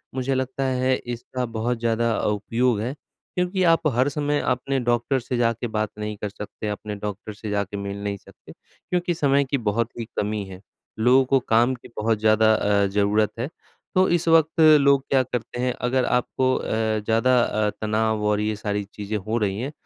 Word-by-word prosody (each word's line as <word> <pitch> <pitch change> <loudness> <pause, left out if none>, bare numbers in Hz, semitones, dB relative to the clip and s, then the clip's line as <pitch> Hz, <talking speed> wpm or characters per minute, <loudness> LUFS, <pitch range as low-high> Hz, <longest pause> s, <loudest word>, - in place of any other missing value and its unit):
मुझे 130 +1 -1
लगता 130 +1 -2
है 130 0 +1 0.2
इसका 125 +1 -4
बहुत 120 +1 -1
ज़्यादा 115 0 +1
उपयोग 115 +2 0
है 125 +6 -3 0.4
क्योंकि 180 +1 0
आप 165 -1 +3
हर 130 +3 +2
समय 145 0 -1
अपने 130 +2 0
डॉक्टर 120 +2 +1
से 125 +1 -3
जाके 115 0 0
बात 110 -1 -2
नहीं 105 0 -4
कर 105 - -4
सकते 105 +1 -7
अपने 105 0 -5
डॉक्टर 105 +1 -6
से 105 0 -7
जाके 100 0 -2
मिल 100 0 -5
नहीं 100 -1 -2
सकते - - -17
क्योंकि 180 0 -4
समय 140 -3 +2
की 140 +1 -1
बहुत 115 0 0
ही 115 - -3
कमी 105 0 -1
है। 95 -1 -10 0.4
लोगों 130 +3 +5
को 135 +1 +3
काम 120 +1 +2
की 120 - -14
बहुत 110 0 +1
ज़्यादा 110 0 +4
अ, 100 -1 +2
ज़रूरत 105 +2 +1
है। 125 +6 -2 0.5
तो 185 0 +5
इस 175 -1 +1
वक़्त 165 0 +4 0.2
लोग 140 -1 +4
क्या 130 -2 +3
करते 120 0 -5
हैं 125 0 0 0.2
अगर 130 0 +1
आपको 130 +1 +1
अ, - - -3 0.3
ज़्यादा 115 +4 +2
अ, 105 0 0
तनाव 110 0 0
और 105 0 +2
ये 105 0 -1
सारी 105 -1 -2
चीजें 105 +1 -4
हो 110 +4 -2
रही 100 -2 -1
हैं 135 +4 -3
115 Hz, 190 wpm, -23 LUFS, 105-130 Hz, 0.5 s, लोगों